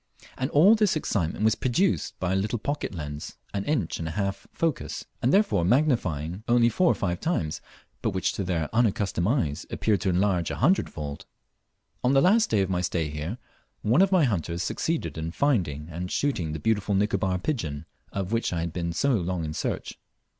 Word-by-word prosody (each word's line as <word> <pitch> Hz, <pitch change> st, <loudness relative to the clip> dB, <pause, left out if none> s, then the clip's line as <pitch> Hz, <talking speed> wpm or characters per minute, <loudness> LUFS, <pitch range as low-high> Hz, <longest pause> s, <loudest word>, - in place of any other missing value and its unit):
And 130 Hz, +2 st, -2 dB
all 170 Hz, +10 st, +6 dB
this 215 Hz, -5 st, +3 dB
excitement 105 Hz, -, -1 dB
was 110 Hz, -, +5 dB
produced 155 Hz, +10 st, 0 dB
by 95 Hz, 0 st, 0 dB
a -, -, +2 dB
little 105 Hz, +5 st, 0 dB
pocket 140 Hz, -3 st, -3 dB
lens, 75 Hz, -2 st, -6 dB, 0.2 s
an 100 Hz, -1 st, -1 dB
inch 140 Hz, -, -1 dB
and 80 Hz, -, -3 dB
a -, -, -3 dB
half 100 Hz, -1 st, -2 dB
focus, 165 Hz, -4 st, -2 dB, 0.2 s
and 125 Hz, -, +2 dB
therefore 155 Hz, -, +3 dB
magnifying 95 Hz, -, +1 dB
only 120 Hz, 0 st, +5 dB
four 180 Hz, +8 st, +3 dB
or -, -, 0 dB
five 90 Hz, -3 st, -2 dB
times, 120 Hz, -, -1 dB, 0.4 s
but -, -, +1 dB
which 95 Hz, 0 st, -1 dB
to 100 Hz, -, -2 dB
their 85 Hz, -4 st, -1 dB
unaccustomed 100 Hz, -6 st, +1 dB
eyes 85 Hz, -, 0 dB
appeared 105 Hz, -5 st, 0 dB
to 95 Hz, -, +1 dB
enlarge 90 Hz, -2 st, +1 dB
a -, -, -3 dB
hundred 180 Hz, +9 st, +2 dB
fold. 75 Hz, -2 st, -7 dB, 0.8 s
On 125 Hz, +2 st, +3 dB
the 135 Hz, -, +6 dB
last 215 Hz, +7 st, +4 dB
day 105 Hz, -3 st, +2 dB
of 95 Hz, -, 0 dB
my 90 Hz, -1 st, +1 dB
stay 85 Hz, -3 st, -1 dB
here, 75 Hz, +9 st, -4 dB, 0.5 s
one 120 Hz, -, +4 dB
of 195 Hz, 0 st, +4 dB
my 185 Hz, -4 st, +5 dB
hunters 90 Hz, -, -1 dB
succeeded 160 Hz, -, -2 dB
in 80 Hz, +1 st, -3 dB
finding 85 Hz, -, 0 dB
and 90 Hz, +3 st, -5 dB
shooting 90 Hz, -, 0 dB
the 80 Hz, -, -4 dB
beautiful 105 Hz, +2 st, +1 dB
Nicobar 95 Hz, -2 st, +1 dB
pigeon, 85 Hz, -, -3 dB, 0.3 s
of 95 Hz, 0 st, -3 dB
which 115 Hz, 0 st, 0 dB
I 85 Hz, -2 st, -1 dB
had 85 Hz, -1 st, -3 dB
been 85 Hz, -1 st, -2 dB
so 140 Hz, +10 st, +1 dB
long 90 Hz, -5 st, -1 dB
in 75 Hz, -, -4 dB
search. -, -, -4 dB
100 Hz, 195 wpm, -26 LUFS, 85-130 Hz, 0.8 s, all